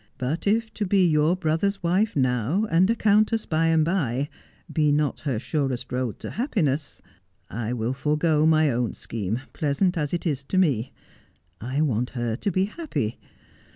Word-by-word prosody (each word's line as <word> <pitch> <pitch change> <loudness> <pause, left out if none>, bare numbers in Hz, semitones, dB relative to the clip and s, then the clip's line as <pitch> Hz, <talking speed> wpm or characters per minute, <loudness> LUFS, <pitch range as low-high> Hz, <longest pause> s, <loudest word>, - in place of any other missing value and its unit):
But 140 +9 -2
if 225 +2 +1
to 215 - -2
be 190 -1 +4
your 155 +2 +3
brother's 185 +3 -1
wife 190 +6 +1
now, 130 - +1
and 180 +4 +4
a 230 - +3
countess 215 +1 +2
by 165 -1 +1
and 160 -1 +3
by, 145 -6 0 0.4
be 150 -2 +3
not 145 -1 +1
her 140 -6 -2
surest 130 -1 -2
road 125 -3 -2
to - - -6
happiness, 160 - -1 0.5
I 115 +3 -3
will 120 +1 -1
forego 150 +3 +2
my 155 -2 +4
own 120 -1 -1
scheme, 110 +2 -4
pleasant 165 +5 0
as 150 -2 -1
it 175 - -2
is 145 -5 0
to 185 - -2
me. 135 - +2 0.7
I 130 +6 -1
want 125 -5 0
her 120 -2 -1
to 170 - -2
be 185 +2 +2
happy. 195 - -4
150 Hz, 170 wpm, -25 LUFS, 130-185 Hz, 0.7 s, be